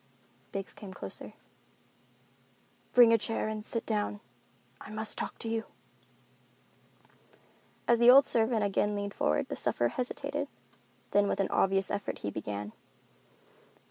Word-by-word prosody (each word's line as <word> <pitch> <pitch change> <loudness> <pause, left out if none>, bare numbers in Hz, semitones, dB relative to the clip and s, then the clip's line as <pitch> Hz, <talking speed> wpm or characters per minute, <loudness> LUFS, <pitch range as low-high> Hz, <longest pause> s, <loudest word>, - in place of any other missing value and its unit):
Biggs 195 0 -4
came 200 -2 -10
closer. - - -6 1.6
"Bring 240 -2 +7
a 230 - +5
chair 225 +1 -1
and 215 -1 -4
sit 230 +1 -2
down. 210 -1 -1 0.6
I - - -10
must 215 0 -1
talk - - -5
to - - -6
you." 225 0 -1 2.2
As 235 -1 +4
the 240 +1 +7
old 270 +2 +9
servant 225 -1 +2
again 205 +1 +1
leaned 200 0 -3
forward, 75 +1 0
the - - -3
sufferer 120 0 0
hesitated; 250 - -3 0.6
then 205 0 +4
with - - -1
an 195 - 0
obvious 195 0 +2
effort 205 0 -3
he 100 - -1
began. 105 0 -5
210 Hz, 135 wpm, -30 LUFS, 195-225 Hz, 2.2 s, old